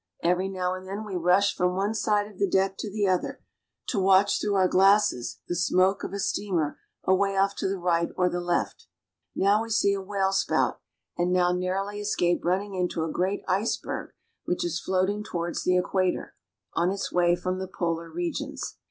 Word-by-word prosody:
Every 180 +2 +1
now 185 -1 -1
and 185 0 -7
then 200 +3 -5
we 200 -3 -5
rush 180 +3 +3
from 180 0 +1
one 200 +3 0
side 210 -2 +1
of 205 -2 -14
the 200 - +2
deck 190 +1 +2
to 215 - -3
the 205 -1 0
other, 185 -1 0 0.5
to - - 0
watch 195 +1 +4
through 205 -1 0
our 190 -1 +4
glasses 195 - +3
the 175 - -2
smoke 185 +3 +2
of - - -4
a 200 - -4
steamer 180 -6 -1 0.2
away 195 +1 +2
off 195 +1 +2
to - - -1
the 195 - -2
right 170 -1 +1
or 180 -1 +3
the 175 0 -2
left. 175 0 -2 0.5
Now 205 +2 +3
we 230 - -5
see 205 -3 +3
a 195 - -2
whale 195 0 0
spout, 195 - +1 0.4
and 175 +1 +1
now 180 -1 +3
narrowly 190 +3 -2
escape 175 -4 0
running 195 +3 0
into 180 -3 -1
a 160 - -3
great 190 +4 -1
iceberg 200 +5 -2 0.3
which 180 - -1
is 170 -1 -2
floating 190 +3 0
towards 175 -5 -3
the 180 0 +3
Equator, 185 0 0 0.4
on 170 +2 +2
its 195 +1 -3
way 175 -1 +4
from 185 +1 -3
the 190 - -4
polar 170 -2 -3
regions. 170 +1 -4
185 Hz, 195 wpm, -26 LUFS, 180-200 Hz, 0.5 s, watch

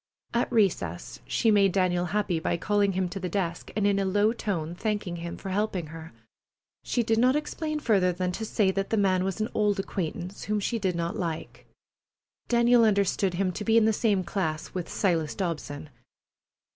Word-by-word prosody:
At 235 +1 0
recess 125 - 0
she 225 - +2
made 200 -3 +4
Daniel 180 -2 +1
happy 200 -3 0
by 165 - -1
calling 200 +2 +1
him 185 0 0
to 195 - -5
the 180 -1 -3
desk 175 -2 -2
and 210 -1 +1
in 200 -1 +3
a - - +1
low 205 +3 +2
tone 175 -8 -3
thanking 205 -2 -2
him 170 0 -6
for 195 - -7
helping 190 -3 -1
her. 165 0 -9 0.7
She 240 - 0
did 225 0 +1
not 255 +3 +4
explain 305 0 -2
further 195 -9 +3
than 180 +1 -2
to 220 - -5
say 210 -3 +1
that 195 0 -2
the 225 - +1
man 190 -2 +2
was 195 +2 -2
an 215 +2 -1
old 210 -2 +1
acquaintance 185 0 -4
whom 210 0 0
she 230 +3 -1
did 190 -4 0
not 170 0 -2
like. 165 -3 -5 0.8
Daniel 235 0 +5
understood 200 -3 +2
him 185 0 0
to 195 - -5
be 225 +1 +3
in 225 - +5
the 220 - +3
same 205 -3 +1
class 160 -5 -3
with 180 -2 -4
Silas 165 -6 0
Dobson. 155 -5 -4
195 Hz, 195 wpm, -27 LUFS, 175-215 Hz, 0.8 s, Daniel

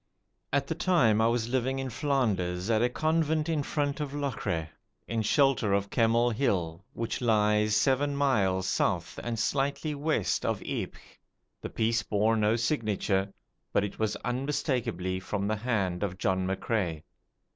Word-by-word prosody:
At 140 0 +1
the 150 - -2
time 155 - +3
I 110 - +4
was 115 -1 0
living 130 +1 0
in 135 -1 -3
Flanders 105 - 0
at 110 -1 +3
a 120 - +3
convent 155 +2 +1
in 160 -3 0
front 145 0 -1
of 145 -1 -4
Locre, 125 - -2 0.4
in 115 -1 -1
shelter 120 -2 +3
of 100 0 0
Kemmel 115 +1 +3
Hill, 95 -8 -1
which 115 +2 -3
lies 105 -2 +3
seven 140 +4 +2
miles 100 -10 +1
south 90 -2 0
and 120 -1 -3
slightly 140 +6 0
west 145 - 0
of - - 0
Ypres. - - -4 0.6
The - - -5
piece 115 0 +1
bore 105 +2 +1
no 110 0 +2
signature, 105 -6 0 0.4
but 100 - +2
it 105 - -5
was 110 -1 0
unmistakably 125 - -1
from 100 +1 -3
the 110 +1 0
hand 105 -6 -1
of 95 -3 -2
John 95 -1 0
McCrae. 95 -5 -1
115 Hz, 155 wpm, -29 LUFS, 100-135 Hz, 0.6 s, I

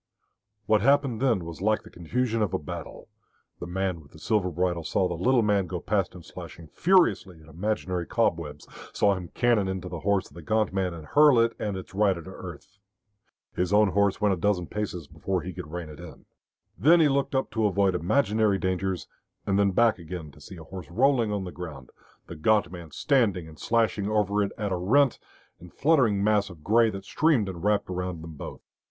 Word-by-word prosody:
What 110 0 +3
happened 135 -2 +2
then 115 -10 +1
was 85 +1 -8
like 110 +2 +1
the - - -14
confusion 115 +6 -1
of 105 -4 0
a - - +2
battle. 85 +1 -8 0.5
The 85 - -6
man 90 -1 -2
with 70 - -20
the - - -13
silver 100 +2 0
bridle 90 0 -1
saw 90 +4 +1
the 90 - -3
little 120 +8 +2
man 100 -3 +2
go 90 0 -4
past 95 0 -1
him 90 - -11
slashing 80 -1 -10
furiously 110 - +2
at 80 - -18
imaginary 90 0 -3
cobwebs, 80 -10 -1 0.3
saw 100 - +3
him 90 -2 -5
cannon 120 -5 +2
into 95 -1 -4
the 85 -1 -5
horse 100 +3 0
of - - -21
the 85 - -10
gaunt 110 +3 0
man 95 -3 -1
and 80 -2 -10
hurl 145 - +5
it 115 0 +3
and 105 -3 -2
its 95 - -9
rider 95 -4 +1
to - - -10
earth. 100 +1 -11 0.8
His 90 0 -1
own 105 0 +5
horse 100 +1 +1
went 105 -2 +2
a - - -2
dozen 90 -1 0
paces 95 -4 -4
before 95 +5 -3
he 90 - -6
could 90 -2 -8
rein 85 -1 -5
it 75 +1 -11
in. 85 -3 -12 0.5
Then 155 - +5
he 160 - +5
looked 140 -1 0
up 130 - 0
to 110 -1 +1
avoid 100 -1 +2
imaginary 105 +2 +2
dangers, 95 -1 -2 0.4
and 100 0 +1
then 100 -1 +4
back 115 +2 +3
again 85 -2 -7
to 75 - -18
see 95 - -11
a 80 - -10
horse 90 -2 -9
rolling 120 +2 +2
on 100 -2 -2
the 90 - -6
ground, 80 -8 -9 0.3
the 85 - -9
gaunt 105 +5 +2
man 85 -3 -9
standing 100 - +1
and 80 -1 -14
slashing 110 -3 +1
over 105 -1 +1
it 100 -1 -1
at 105 -2 -2
a 90 - 0
rent 125 +9 +3 0.4
and 90 0 -13
fluttering 130 -10 +2
mass 105 -1 +2
of 85 -4 -13
grey 115 +4 +4
that 100 -2 -7
streamed 145 -5 +2
and 90 -2 -7
wrapped 105 0 +1
about 90 -1 -4
them 80 - -8
both. 75 - -8
95 Hz, 210 wpm, -26 LUFS, 85-110 Hz, 0.8 s, hurl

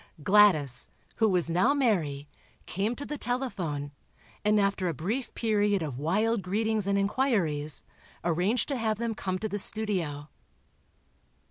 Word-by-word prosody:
Gladys, 165 -10 +4 0.3
who 220 -1 +3
was 180 -4 +2
now 185 - +2
Mary, 165 - 0 0.4
came 205 +6 -2
to 285 - -6
the 295 -1 -5
telephone, 195 - -3 0.5
and 210 0 +3
after 200 -2 +1
a 165 - -2
brief 220 - -3
period 205 -4 +1
of 135 -5 -5
wild 210 +8 +1
greetings 210 +2 0
and 200 0 +2
inquiries, 195 - +1 0.4
arranged 180 +8 +1
to 275 - -1
have 220 -2 0
them 230 0 -2
come 185 -3 -3
to 220 - -3
the 205 0 -2
studio. 180 -10 -1
200 Hz, 140 wpm, -28 LUFS, 165-220 Hz, 0.5 s, Gladys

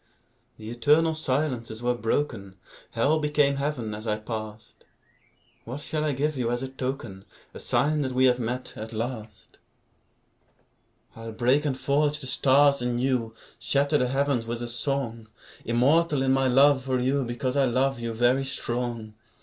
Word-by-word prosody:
The 110 +1 -8
eternal 150 +7 +3
silences 130 -6 -2
were 125 0 +2
broken; 115 -5 -2 0.4
Hell 145 +7 +2
became 150 -2 +2
Heaven 135 -6 -2
as 110 +2 -7
I 105 0 0
passed. 110 0 -8 0.8
What 125 +5 -6
shall 150 +1 -2
I 155 - +1
give 150 +3 -1
you 120 -2 -1
as 120 +1 -2
a - - -3
token, 130 -7 -5 0.3
A - - -9
sign 150 +1 +1
that 130 -2 -2
we 130 +1 +3
have 125 -1 +3
met, 125 +2 -4
at 110 +1 -7
last? 110 -2 -6 1.6
I'll 115 0 -7
break 125 +6 +2
and 130 -3 -1
forge 145 +1 +1
the 145 - -6
stars 140 +1 +4
anew, 120 -2 -1 0.2
Shatter 145 +1 +1
the 125 - +1
heavens 135 -3 0
with 120 +1 -3
a - - -3
song; 120 -2 -2 0.4
Immortal 140 +5 +2
in 130 - +2
my 135 0 +2
love 135 +1 +4
for 130 -1 0
you, 130 +2 +1
Because 120 +2 -3
I 140 -1 +3
love 130 +1 +1
you, 115 0 -3
very 120 +4 +2
strong. 120 -4 -3
130 Hz, 160 wpm, -26 LUFS, 115-140 Hz, 1.6 s, stars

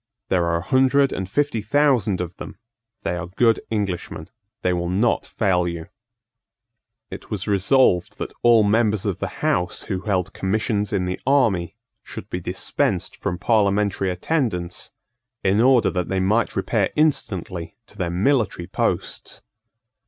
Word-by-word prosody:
There 90 -2 +2
are 85 0 +1
a 85 - -1
hundred 135 +4 +3
and 95 0 -4
fifty 145 -1 0
thousand 115 -5 +2
of 90 -1 -5
them: - - -9 0.5
they 90 - -1
are 90 0 -5
good 115 +5 +2
Englishmen: 95 -6 -3 0.3
they 90 - +2
will 85 0 -2
not 105 +6 +1
fail 90 -5 +1
you." 85 +1 -5 1.2
It - - -9
was 105 -3 -3
resolved 100 -1 +3
that - - -5
all 120 -2 +6
members 105 -1 +2
of - - -2
the - - -2 0.2
House 90 0 0
who 95 -3 -3
held 95 -2 -1
commissions 105 +1 -1
in 95 -3 0
the 90 0 -3
army 110 -11 +2 0.3
should - - -10
be - - -2
dispensed - - -1
from 90 - -3
parliamentary 100 -2 +1
attendance, 90 - -2 0.5
in 100 +3 +3
order 125 -2 +4
that 90 -2 -2
they 95 - 0
might 105 +5 +1
repair - - +1
instantly 95 - -1
to - - -17
their 90 -4 -2
military 100 0 +1
posts. - - -3
100 Hz, 150 wpm, -22 LUFS, 90-115 Hz, 1.2 s, all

